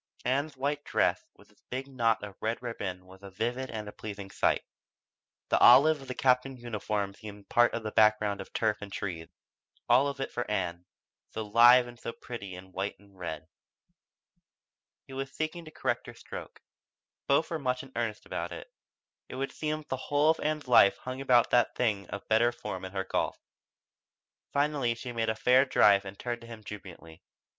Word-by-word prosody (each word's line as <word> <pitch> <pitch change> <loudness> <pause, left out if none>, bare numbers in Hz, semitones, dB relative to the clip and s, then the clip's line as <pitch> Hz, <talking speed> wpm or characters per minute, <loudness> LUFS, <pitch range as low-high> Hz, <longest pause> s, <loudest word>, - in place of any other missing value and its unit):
Ann's 140 +3 0
white 145 +2 -1
dress - - +1
with - - -20
its - - -29
big 130 +2 -4
knot 115 -5 +1
of 100 -2 -7
red 110 +1 -1
ribbon 95 -6 -5
was 95 +1 -15
a 100 - -9
vivid 120 +7 -3
and 110 -2 -5
a - - -6
pleasing 100 -2 -8
spot. - - +2 0.9
The - - +3
olive 140 +5 +7
of 135 - -11
the 130 - -5
Captain's 130 0 +2
uniform 105 -3 -2
seemed 105 -1 -11
part 120 0 +4
of 115 - -4
the 110 - -3
background 105 -2 +3
of - - -11
turf 110 -2 0
and 100 -1 -8
trees 85 -5 -4 0.6
all 130 +4 +5
of 140 -1 -4
it - - -3
for 120 - -4
Ann, 90 -4 -2 0.4
so 110 - -4
live 120 +4 +7
and 120 -1 -12
so 115 - -5
pretty 100 -6 -8
in 95 +1 -12
white 95 +2 -3
and 100 0 -22
red. 80 -4 -6 1.6
He 135 - -12
was 135 +1 -4
seeking 155 +3 -4
to 155 - -11
correct - - -2
her - - -9
stroke. - - -9 0.6
Both 140 +5 +2
were 165 - -1
much 125 -2 -1
in 135 - -13
earnest 115 -2 -3
about - - -4
it. - - -9 0.6
It - - -7
would 135 +1 -3
seem 155 0 -3
that 150 - -21
the 130 - -1
whole 145 +4 +3
of 160 - -3
Ann's 155 -2 -2
life 115 -5 +6
hung 130 +1 -6
upon 125 -3 +5
that 120 -2 +3
thing 105 -6 0
of 100 +1 -7
better 115 +2 +4
form 95 -6 -6
in 95 - -8
her 95 -1 -1
golf. - - -1 1.1
Finally 140 -4 +1
she 120 +1 -7
made 115 -1 -1
a 110 - 0
fair 125 +4 +5
drive 100 -7 +4
and 95 0 -8
turned 120 -1 -4
to 115 - -12
him 115 -2 -10
jubilantly. 90 -6 -10
115 Hz, 195 wpm, -29 LUFS, 100-130 Hz, 1.6 s, olive